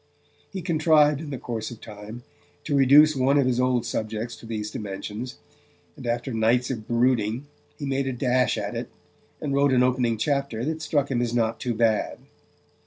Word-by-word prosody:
He 190 -3 -5
contrived 155 -3 +3
in 155 - -7
the 135 - -4
course 115 -3 -4
of 120 - -10
time 110 +2 -10 0.4
to 145 - -1
reduce 145 +3 +6
one 135 +2 +3
of 140 - +4
his 125 -1 +1
old 125 -2 +1
subjects 110 +1 -3
to 115 - -12
these 105 -2 -4
dimensions, 105 +4 -6 0.6
and 125 - -8
after 120 +2 -2
nights 115 +3 +2
of 110 -4 -6
brooding 120 0 +1 0.3
he 145 - -5
made 135 0 -1
a - - 0
dash 125 0 +1
at - - -3
it, - - -4 0.5
and 140 -2 -3
wrote 140 -1 +3
an 125 -1 +4
opening 125 -3 +1
chapter 140 -1 -1
that 160 +1 -3
struck 145 -3 0
him 120 -2 +1
as 120 -1 -1
not 115 -1 0
too 120 -2 -2
bad. 110 -1 +1
125 Hz, 185 wpm, -25 LUFS, 115-140 Hz, 0.6 s, reduce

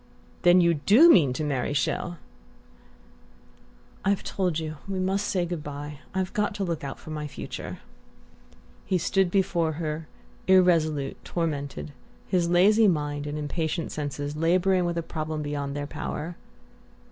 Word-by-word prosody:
"Then 175 0 +6
you 170 -1 +4
DO 215 - +6
mean 150 - +5
to 140 - -3
marry 145 -1 -1
Chelles?" 175 +5 -1 1.9
"I've 200 0 +1
told 180 -5 -1
you 155 -1 -4
we 195 -1 -3
must 195 +2 0
say 180 -2 0
good 170 -3 -4
bye. 145 0 -7 0.2
I've 190 -1 -1
got 210 -2 0
to 200 - -2
look 170 -5 -3
out 135 -1 -5
for 155 - -10
my 150 -1 -4
future." - - -7 1.1
He 185 - +1
stood 185 +2 +2
before 170 -4 +1
her, 155 0 -4 0.4
irresolute, 165 -7 +3
tormented, 145 -3 -3 0.3
his 175 -3 +1
lazy 205 +5 +5
mind 145 -4 -1
and 145 +1 -4
impatient 160 +2 -2
senses 145 0 -4
labouring 180 +3 +2
with 170 0 -1
a 170 - -1
problem 155 -1 -4
beyond 145 -1 -3
their 145 0 -3
power. 165 +3 -5
165 Hz, 145 wpm, -26 LUFS, 150-185 Hz, 1.9 s, Then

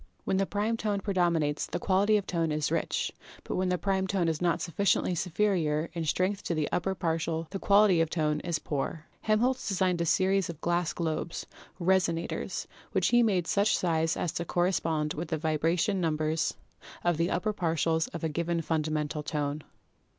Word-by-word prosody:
When 190 - 0
the 195 0 +1
prime 215 +3 0
tone 210 -2 -1
predominates 170 -7 +1
the - - -3
quality 200 +3 +3
of 200 - -3
tone 165 -3 0
is 150 -1 -1
rich, - - 0 0.3
but - - -4
when 185 0 +1
the 180 - +1
prime 190 +2 0
tone 185 -3 +1
is 160 0 -1
not 175 -1 +2
sufficiently 180 +1 +1
superior 170 -3 0
in 165 -2 -3
strength 185 +5 0
to 170 - -1
the 155 -2 0
upper 190 +2 0
partials 165 -2 -1
the 195 - -3
quality 200 -4 +5
of 165 - +1
tone 150 -2 0
is 170 0 -1
poor." 150 +2 -3 0.2
Helmholtz 235 +4 +1
designed 185 -3 +1
a - - +1
series 190 +2 +2
of 165 -3 -7
glass 175 0 0
globes, 165 0 -3 0.3
"resonators," 175 -2 0 0.3
which - - +2
he 240 - +4
had 240 - +5
made 185 -5 +1
of - - -2
such 205 +2 +3
size 165 -2 +1
as 175 - -1
to 170 - -3
correspond 165 -3 0
with 165 +2 -4
the 160 - -1
vibration 165 +5 +1
numbers 155 -1 0 0.5
of 175 -2 +2
the 170 +2 +1
upper 215 +4 0
partials 165 -3 0
of 170 - -6
a - - +2
given 170 +2 -1
funda 155 -1 0
mental 150 0 -2
tone. 150 0 -2
170 Hz, 190 wpm, -29 LUFS, 160-190 Hz, 0.5 s, quality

